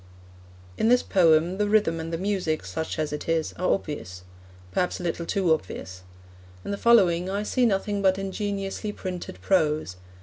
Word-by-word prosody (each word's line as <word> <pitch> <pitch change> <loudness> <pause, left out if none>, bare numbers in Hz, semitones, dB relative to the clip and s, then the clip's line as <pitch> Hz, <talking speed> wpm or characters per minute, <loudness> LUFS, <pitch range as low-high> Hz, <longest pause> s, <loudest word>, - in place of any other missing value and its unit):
In 220 - +3
this 245 0 +4
poem, 170 +1 +3
the 205 0 +1
rhythm 205 -6 +2
and 160 0 -5
the 165 - -1
music, 185 - -1
such 95 +13 -4
as 155 -1 -2
it 150 - -5
is, 165 -1 0
are 185 - +1
obvious 90 - -4 0.5
perhaps 180 - -1
a - - -6
little 170 -1 -3
too 185 -5 +2
obvious. 95 -8 -5 0.6
In - - -3
the - - 0
following 185 -7 +4
I 200 +2 -1
see 245 +3 +2
nothing 200 0 0
but 190 -1 +3
ingeniously 195 +1 -3
printed 180 - -6
prose. 150 - +1
180 Hz, 170 wpm, -25 LUFS, 160-200 Hz, 0.6 s, this